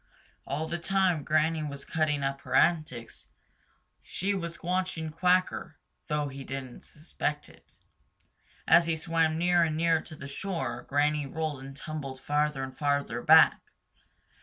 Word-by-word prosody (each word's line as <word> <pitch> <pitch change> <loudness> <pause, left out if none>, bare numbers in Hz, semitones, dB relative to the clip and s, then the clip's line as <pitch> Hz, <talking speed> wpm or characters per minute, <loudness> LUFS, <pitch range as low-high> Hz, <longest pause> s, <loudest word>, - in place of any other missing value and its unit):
All 150 +4 -2
the 170 +1 -3
time 185 -3 +1
Granny 155 +1 +1
was 140 -2 -6
cutting 150 -3 0
up 135 0 -2
her - - -4
antics, 155 -9 +1 0.7
she 195 +3 -2
was 170 -3 -5
watching 180 -3 -2
Quacker, 180 +3 +1 0.3
though 150 -1 0
he 135 0 -8
didn't 130 -2 -7
suspect 150 -1 -4
it. - - -20 1.0
As 170 0 +6
he 165 - +1
swam 160 0 0
nearer 175 0 +3
and 155 -1 -2
nearer 165 -1 +2
to 155 - -11
the 140 -2 -9
shore, 175 +5 -4
Granny 145 +1 +1
rolled 155 -1 -3
and 135 0 -10
tumbled 140 -3 -6
farther 150 -1 0
and 130 0 -7
farther 140 -5 -1
back. - - +6
155 Hz, 145 wpm, -29 LUFS, 140-170 Hz, 1.0 s, As